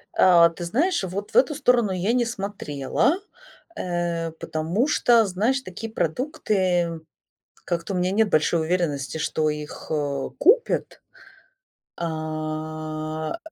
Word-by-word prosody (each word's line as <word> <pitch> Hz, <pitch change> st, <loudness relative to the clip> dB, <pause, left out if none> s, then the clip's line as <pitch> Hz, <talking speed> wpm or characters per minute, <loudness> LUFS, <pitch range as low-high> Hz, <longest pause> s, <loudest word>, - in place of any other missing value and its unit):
А, 170 Hz, -2 st, +7 dB
ты 170 Hz, +1 st, -8 dB
знаешь, 290 Hz, -, +1 dB
вот 190 Hz, +3 st, -4 dB
в -, -, -19 dB
эту 465 Hz, -11 st, +4 dB
сторону 245 Hz, -7 st, +3 dB
я 185 Hz, +5 st, 0 dB
не 245 Hz, -1 st, +2 dB
смотрела, 200 Hz, -, -1 dB, 0.6 s
э, 175 Hz, -, -2 dB
потому 165 Hz, -, -1 dB
что, 240 Hz, -6 st, +4 dB
знаешь, 215 Hz, +8 st, 0 dB
такие 220 Hz, +2 st, -7 dB
продукты, 180 Hz, -, 0 dB, 0.6 s
как-то 175 Hz, +2 st, -2 dB
у -, -, -1 dB
меня 180 Hz, +1 st, +1 dB
нет 215 Hz, +1 st, +2 dB
большой 160 Hz, +1 st, +2 dB
уверенности, 160 Hz, -4 st, -1 dB
что 155 Hz, 0 st, 0 dB
их, 150 Hz, 0 st, -6 dB
э, 145 Hz, -3 st, -1 dB
купят. 465 Hz, -, +2 dB, 1.0 s
А, 155 Hz, -1 st, -4 dB
э, -, -, -5 dB
175 Hz, 125 wpm, -24 LUFS, 155-215 Hz, 1.0 s, А